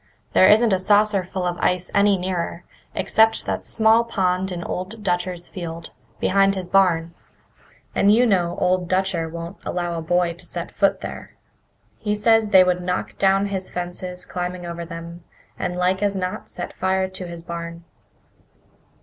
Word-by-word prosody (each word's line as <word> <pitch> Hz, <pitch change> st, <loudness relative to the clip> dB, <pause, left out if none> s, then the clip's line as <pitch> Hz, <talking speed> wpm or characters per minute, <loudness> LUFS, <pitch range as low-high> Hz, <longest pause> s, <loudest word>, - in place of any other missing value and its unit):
"There 185 Hz, -, +6 dB
isn't 220 Hz, 0 st, +5 dB
a 190 Hz, -, +2 dB
saucerful 195 Hz, -2 st, +2 dB
of 175 Hz, -1 st, -2 dB
ice 180 Hz, 0 st, 0 dB
any 200 Hz, -1 st, +4 dB
nearer, 180 Hz, -1 st, -3 dB, 0.3 s
except 220 Hz, +4 st, +2 dB
that -, -, -2 dB
small 225 Hz, +1 st, +3 dB
pond 190 Hz, -4 st, 0 dB
in 175 Hz, -1 st, -4 dB
Old 205 Hz, +6 st, -5 dB
Dutcher's 175 Hz, -1 st, -1 dB
field, 170 Hz, -2 st, -7 dB, 0.3 s
behind 195 Hz, +1 st, +3 dB
his 185 Hz, -2 st, -4 dB
barn. 170 Hz, -4 st, +3 dB, 0.8 s
And 200 Hz, -, +4 dB
you 235 Hz, +4 st, +5 dB
know 180 Hz, -6 st, +1 dB
Old 180 Hz, -1 st, +1 dB
Dutcher 185 Hz, -3 st, 0 dB
won't 170 Hz, +3 st, -7 dB
allow 175 Hz, -1 st, -2 dB
a 165 Hz, -, -3 dB
boy 175 Hz, +1 st, +1 dB
to 175 Hz, -, -12 dB
set 170 Hz, -1 st, -6 dB
foot 195 Hz, -1 st, +1 dB
there. -, -, -8 dB, 0.6 s
He 210 Hz, -1 st, -1 dB
says 225 Hz, 0 st, +3 dB
they 190 Hz, -2 st, +7 dB
would 180 Hz, 0 st, +1 dB
knock 180 Hz, +1 st, -3 dB
down 195 Hz, +1 st, +3 dB
his 190 Hz, -1 st, -4 dB
fences 180 Hz, +1 st, -6 dB
climbing 180 Hz, 0 st, -4 dB
over 170 Hz, 0 st, -5 dB
them, 170 Hz, 0 st, -9 dB, 0.4 s
and 180 Hz, -, -2 dB
like 180 Hz, +2 st, +1 dB
as 200 Hz, -1 st, +1 dB
not 185 Hz, -1 st, -4 dB
set 175 Hz, -, -6 dB
fire 190 Hz, 0 st, 0 dB
to 185 Hz, -1 st, -7 dB
his 170 Hz, -1 st, -8 dB
barn." 170 Hz, 0 st, -6 dB
185 Hz, 165 wpm, -22 LUFS, 175-195 Hz, 0.8 s, they